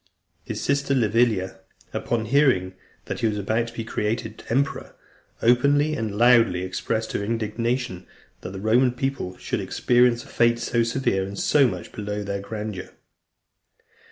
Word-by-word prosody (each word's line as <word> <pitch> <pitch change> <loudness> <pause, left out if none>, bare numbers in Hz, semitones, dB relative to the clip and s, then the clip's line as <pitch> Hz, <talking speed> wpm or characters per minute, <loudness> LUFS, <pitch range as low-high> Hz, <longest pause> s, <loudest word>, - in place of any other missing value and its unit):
His - - -5
sister, 140 0 0
Livilla, 110 -5 +1 0.3
upon 115 -2 -1
hearing 115 -8 +3 0.3
that - - -4
he 115 - +2
was 105 -1 -1
about 110 +4 0
to 115 - -10
be 115 - -3
created 110 +1 -3
emperor, 140 +4 -1 0.5
openly 140 +6 +4
and 110 -6 -3
loudly 115 -6 +5
expressed 110 +4 -2
her - - -2
indignation 115 -2 -2 0.3
that - - -6
the 95 0 -7
Roman 120 +5 +3
people 135 -8 -3
should - - -3
experience 120 -1 +2
a - - -16
fate 120 0 +2
so 120 0 0
severe 115 -4 0
and 100 +1 -6
so 140 +4 +4
much 90 -6 -6
below 105 0 -4
their 100 0 -3
grandeur. 105 -2 -6
115 Hz, 150 wpm, -24 LUFS, 100-125 Hz, 0.5 s, loudly